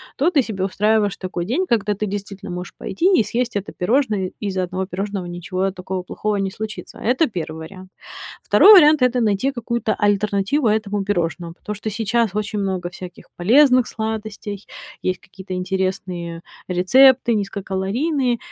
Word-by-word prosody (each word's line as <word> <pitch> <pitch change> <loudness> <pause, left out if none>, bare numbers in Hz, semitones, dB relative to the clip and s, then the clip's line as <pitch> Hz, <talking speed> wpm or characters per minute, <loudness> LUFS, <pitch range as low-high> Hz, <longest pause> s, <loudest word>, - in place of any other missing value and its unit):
то 295 +6 +2
ты 300 -5 +4
себе 210 -6 -4
устраиваешь 210 +1 +1
такой 185 -2 -4
день, 270 - 0
когда 210 - +1
ты 205 +1 -3
действительно 200 -1 -6
можешь 180 +1 -6
пойти 365 - +2
и - - +4
съесть 235 +2 -2
это 200 - -5
пирожное, 210 -2 0
из-за 190 -3 -2
1 185 +1 -3
пирожного 195 0 -4
ничего 185 +2 -3
такого 185 0 -5
плохого 210 +3 -2
не 195 -1 -1
случится. 215 +1 -7
Это 255 +7 +2
1 160 -6 -5
вариант. 185 +1 -13 0.5
2 420 - +7
вариант- 310 -6 +7
это 250 0 +3
найти 220 +4 +1
какую-то 235 -3 -2
альтернативу 205 +5 +1
этому 210 -2 0
пирожному, 175 -3 -2
потому 210 +4 -7
что 210 +2 -4
сейчас 225 +1 0
очень 210 0 -2
много 190 -3 -2
всяких 180 0 -10
полезных 255 +6 +5
сладостей, 220 -2 -5 0.4
есть 185 -1 -1
какие-то 190 0 -9
интересные 180 -2 -3 0.3
рецепты 245 +7 +5
низкокалорийные. 210 - -1
205 Hz, 150 wpm, -21 LUFS, 185-230 Hz, 0.5 s, 2